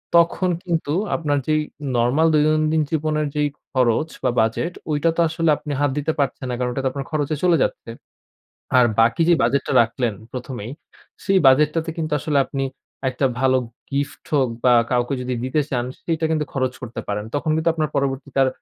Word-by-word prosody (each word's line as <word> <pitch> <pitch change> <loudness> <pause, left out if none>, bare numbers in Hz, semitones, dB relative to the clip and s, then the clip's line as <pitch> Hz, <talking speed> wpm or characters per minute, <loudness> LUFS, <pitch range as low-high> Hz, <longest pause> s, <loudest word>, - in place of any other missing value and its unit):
তখন 170 +2 +3
কিন্তু 165 -4 -1 0.2
আপনার 145 -3 0
যেই 155 0 +2 0.4
নরমাল 125 +7 +3
দৈনন্দিন 155 +1 +3
জীবনের 155 -1 0
যেই 150 -1 +1 0.2
খরচ 130 +4 +2
বা 125 - +3
বাজেট 115 +10 -1 0.2
ঐটা 150 +2 +2
তো 170 - +2
আসলে 165 0 0
আপনি 150 - -7
হাত 145 - +3
দিতে 150 +2 0
পারছেন 135 -1 -1
না, 125 - -1
কারণ 125 0 0
ওটা 135 - -2
তো - - +3
আপনার 140 +1 -5
খরচে 155 0 0
চলে 175 -2 +4
যাচ্ছে। - - -4 0.9
আর 125 - +7 0.2
বাকি 115 +8 +3
যে 175 - +7
বাজেটটা 140 - +1
রাখলেন 115 0 -2 0.2
প্রথমেই, 125 -3 -6 0.5
সেই 195 -1 +4
বাজেটটাতে 150 +5 +4
কিন্তু 155 -1 -3
আসলে 150 -1 +1
আপনি 135 0 -3 0.4
একটা 130 +1 0
ভালো 130 0 +3 0.3
গিফট 140 0 -3
হোক 135 -4 +3 0.2
বা 125 - +6 0.2
কাউকে 120 +2 +1
যদি 125 0 -2
দিতে 130 +4 +1
চান 125 -2 0 0.2
সেইটা 165 -1 -1
কিন্তু 155 -1 +1
খরচ 130 -2 0
করতে 120 -2 -5
পারেন। 105 +1 -2
তখন 145 +2 -1
কিন্তু 160 +1 +1
আপনার 155 -3 -1
পরবর্তীতে 140 0 -2
আর 130 - +2
145 Hz, 180 wpm, -22 LUFS, 130-155 Hz, 0.9 s, আর